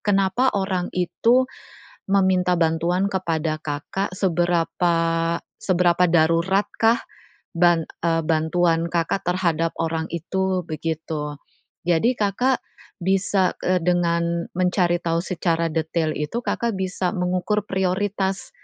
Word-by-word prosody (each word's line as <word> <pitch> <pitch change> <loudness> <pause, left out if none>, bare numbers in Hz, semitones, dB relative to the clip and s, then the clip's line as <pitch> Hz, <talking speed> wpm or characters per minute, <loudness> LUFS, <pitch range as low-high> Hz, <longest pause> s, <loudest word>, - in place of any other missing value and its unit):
kenapa 205 +5 +2
orang 190 -2 -1
itu 235 +8 +3 0.6
meminta 190 -2 +3
bantuan 170 +3 +1
kepada 160 -4 -1
Kakak, 155 +6 -4
seberapa 175 -2 +1 0.7
seberapa 180 -1 +3
daruratkah 190 +7 +2 0.6
ban 170 -1 +3 0.2
eee, 165 -1 +2
bantuan 165 +1 +1
Kakak 170 +3 0
terhadap 165 -3 0
orang 160 -1 -1
itu, 190 +2 -1
begitu. 155 -2 -4 0.5
Jadi, 175 +9 +3
Kakak 245 +6 +1 0.4
bisa 190 0 +1
eee, 185 0 +2
dengan 170 -1 +1
mencari 180 -1 +2
tahu 165 0 0
secara 170 -3 0
detail 160 0 -1
itu, 150 +11 -3
Kakak 235 -2 -1
bisa 185 -1 -1
mengukur 185 +3 0
prioritas, 190 - -1
175 Hz, 105 wpm, -23 LUFS, 165-190 Hz, 0.7 s, itu